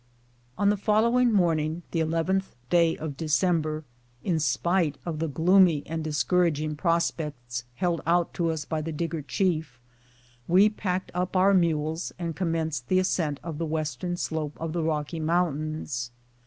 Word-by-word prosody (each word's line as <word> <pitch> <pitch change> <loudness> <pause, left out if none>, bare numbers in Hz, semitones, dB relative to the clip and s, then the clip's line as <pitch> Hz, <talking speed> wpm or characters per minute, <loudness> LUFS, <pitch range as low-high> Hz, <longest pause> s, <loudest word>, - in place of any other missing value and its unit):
On 200 - +3
the 210 - 0
following 230 +4 +3
morning 165 -4 +1
(the 165 - 0
11th 165 +4 0 0.2
day. 170 -2 +4
of 155 -3 -5
December), 155 0 0 0.4
in 175 -3 +1
despite 155 +1 +1
of 165 -3 -3
the 165 - 0
gloomy 170 0 +4
and 160 0 -4
discouraging 155 0 +1
prospects 150 -7 -1
held 175 0 0
out 170 0 +2
to 170 -1 0
us 160 -2 -2
by 155 0 -2
the 165 +2 -4
Digger 165 0 -3
chief, 155 -3 -1 0.7
we 190 +5 +6
packed 190 -3 -3
up 180 +2 -2
our 190 +2 +5
mules 160 -2 +1
and 170 -3 -4
commenced 160 -7 -2
the 185 - +2
ascent 165 -6 0
of 165 -3 -5
the 165 - -1
western 155 +2 -2
slope 155 -3 -3
of 160 -1 -3
the 170 - -1
Rocky 155 0 -2
Mountains. 155 -6 -1
165 Hz, 155 wpm, -27 LUFS, 155-180 Hz, 0.7 s, we